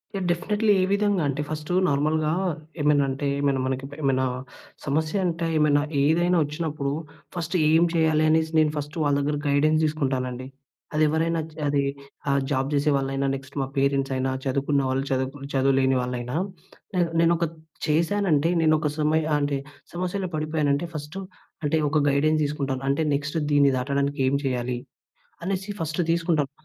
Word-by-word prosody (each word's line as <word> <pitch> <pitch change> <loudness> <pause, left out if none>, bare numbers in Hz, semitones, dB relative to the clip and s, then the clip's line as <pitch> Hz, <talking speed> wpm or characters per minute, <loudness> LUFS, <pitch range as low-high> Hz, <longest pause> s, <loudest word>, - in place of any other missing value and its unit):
Yeah! 190 -2 -2
Definitely. 210 +4 +1
ఏ - - +3
విధంగంటే, 195 -9 +1
first 155 +2 -4
నార్మల్‌గా 155 +2 +1 0.5
ఏమైనంటే, 145 -1 +2
ఏమైనా 140 -2 +1
మనకి 130 +1 -2
ప్ - - -9
ఏమైనా 130 -2 +2 0.6
సమస్యంటే, 165 +4 0
ఏమైనా 150 -1 +4 0.2
ఏదైనా 175 +4 +3
ఒచ్చినప్పుడు, 150 -2 -3 0.4
ఫస్ట్ 170 +1 -3
ఏం 160 +2 +5
చెయ్యాలి 160 -2 +3
అనేసి, 160 0 +2
నేను 155 -1 +3
ఫస్టు 150 +3 -5
వాళ్ళ 145 -1 +2
దగ్గర 145 +1 0
గైడెన్స్ 155 +2 +3
తీసుకుంటానండి. 130 -4 -2 0.5
అదెవ్వరైనా 160 +2 +2
జ్ - - -19
అదీ 140 0 +2 0.5
ఆహ్, 140 0 +3
జాబ్ 135 -1 +1
జేసే 145 +1 +2
వాళ్ళైనా, 135 0 -1
నెక్స్ట్ 135 0 -10
మా 135 - -1
పేరెంట్సయినా, 135 -1 +1
చదువుకున్న 140 +1 +1
వాళ్ళు, 130 +1 0
చదువుకు 130 +2 -2
చదువు 135 0 +3
లేని 130 0 +3
వాళ్ళైనా, 125 +1 -4 0.6
నేను 175 -2 +2
నేనొత్ 165 -1 +2 0.3
చేశానంటే, 165 0 +2
నేనొక 155 -1 +3
సమయ 155 +1 +2 0.2
అంటే, 145 -1 0 0.4
సమస్యలో 185 +2 -2
పడిపోయానంటే, 155 0 0
ఫస్టు 150 +6 -6 0.4
అంటే, 150 +2 +2
ఒక 155 -1 +3
గైడెన్స్ 155 +3 +2
తీసుకుంటాను. 140 -3 -3
అంటే, 140 +3 +1
నెక్స్ట్ 145 +3 -3
దీన్ని 140 -1 +5
దాటడానికేం 140 +1 0
చెయ్యాలి, 125 -1 -1 0.7
అనేసి 195 +2 -2
ఫస్ట్ 160 +1 -2
తీసుకుంటాను. 165 -4 +1
150 Hz, 140 wpm, -25 LUFS, 140-160 Hz, 0.7 s, ఏం